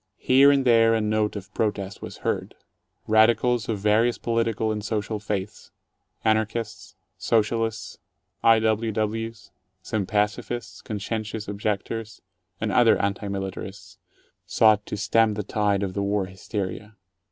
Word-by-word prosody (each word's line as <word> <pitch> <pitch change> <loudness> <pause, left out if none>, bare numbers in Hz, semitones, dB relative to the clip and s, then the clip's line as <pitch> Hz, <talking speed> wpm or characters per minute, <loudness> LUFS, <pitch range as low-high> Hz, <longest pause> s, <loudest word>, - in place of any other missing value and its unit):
Here 135 +2 +5
and 140 -2 +3
there 115 -2 +5
a - - +1
note 105 0 0
of 100 0 -8
protest 100 -3 -2
was - - -8
heard. - - -2 0.5
Radicals 110 +1 +3
of 110 - 0
vari 105 +4 +3
ous 120 - -4
political 115 -1 0
and 105 -1 -3
social 105 0 -2
faiths 105 0 -5 0.3
— - - -38
Anarchists, 110 0 -1 0.2
Socialists, 115 0 0 0.4
I. 115 0 +6
W. 110 0 +1
Ws., 110 +1 -3 0.3
some 105 -2 -2
pacifists, 105 +2 -2
conscientious 110 +1 -4
objectors, 105 +2 -4 0.4
and 110 -1 -1
other 115 +2 +5
anti 100 +1 -1
militarists 95 -1 -6 0.3
— - - -43
sought 110 -2 +5
to - - -4
stem 115 0 +2
the 105 - -3
tide 100 -1 0
of 95 -2 -3
the 100 - -2
war 100 0 0
hysteria. 100 +2 -6
110 Hz, 140 wpm, -25 LUFS, 105-115 Hz, 0.5 s, I